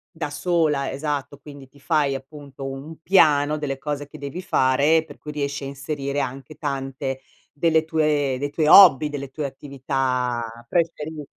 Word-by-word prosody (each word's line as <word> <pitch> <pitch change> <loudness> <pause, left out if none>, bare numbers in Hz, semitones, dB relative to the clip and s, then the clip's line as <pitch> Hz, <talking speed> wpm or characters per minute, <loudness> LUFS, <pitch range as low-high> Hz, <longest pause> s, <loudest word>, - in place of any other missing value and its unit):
da 160 -3 -3
sola, 150 -2 0
esatto, 145 0 -4
quindi 140 -2 -12
ti 140 +2 -22
fai 145 -2 +1
appunto 135 0 -8
un 150 +4 -9
piano 150 -4 +4
delle 135 -3 -4
cose 145 0 -4
che 155 - -12
devi 145 +6 -6
fare, 145 +5 +3
per 145 - -13
cui 150 - -8
riesci 140 -1 -3
a - - -4
inserire 140 0 -4
anche 135 +2 -5
tante 135 -2 -4 0.3
delle 160 +1 +2
tue 150 -4 +1
dei 145 +1 -3
tuoi 155 -1 0
hobby, 155 -5 +8
delle 140 -2 -6
tue 150 +1 -4
attività 130 -3 -2 0.3
preferi 160 -3 -1
145 Hz, 160 wpm, -23 LUFS, 135-155 Hz, 0.3 s, hobby